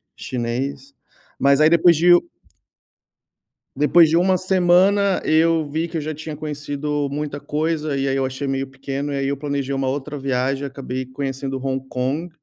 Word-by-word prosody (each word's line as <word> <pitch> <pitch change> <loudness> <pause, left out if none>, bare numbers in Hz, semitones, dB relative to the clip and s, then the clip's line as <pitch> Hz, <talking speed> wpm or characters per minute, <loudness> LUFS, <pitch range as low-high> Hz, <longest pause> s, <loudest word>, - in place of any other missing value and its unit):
chinês. 130 +3 -4 0.5
Mas 140 +1 +4
aí, 155 - +6
depois 170 +1 +5
de 175 +3 +4 1.6
depois 150 +4 +5
de 160 - +1
uma 185 +2 +3
semana, 185 +2 +3
eu 160 0 +3
vi 160 +3 -2
que 165 0 -5
eu - - -2
já 155 +1 -4
tinha 155 +1 -7
conhecido 150 -1 -3
muita 145 0 -4
coisa 155 -1 -2
e 135 0 -1
aí 135 - 0
eu 135 - 0
achei 130 +2 -4
meio 135 0 -2
pequeno. 135 +2 -5
E 140 - -2
aí 135 0 -1
eu 140 0 -1
planejei 140 -1 -3
uma 135 -1 -1
outra 145 +2 -3
viagem 135 +1 -1
e - - -2
acabei 130 -1 -5
conhecendo 135 0 -4
Hong 135 0 -2
Kong. 135 +7 -2
145 Hz, 175 wpm, -21 LUFS, 135-160 Hz, 1.6 s, aí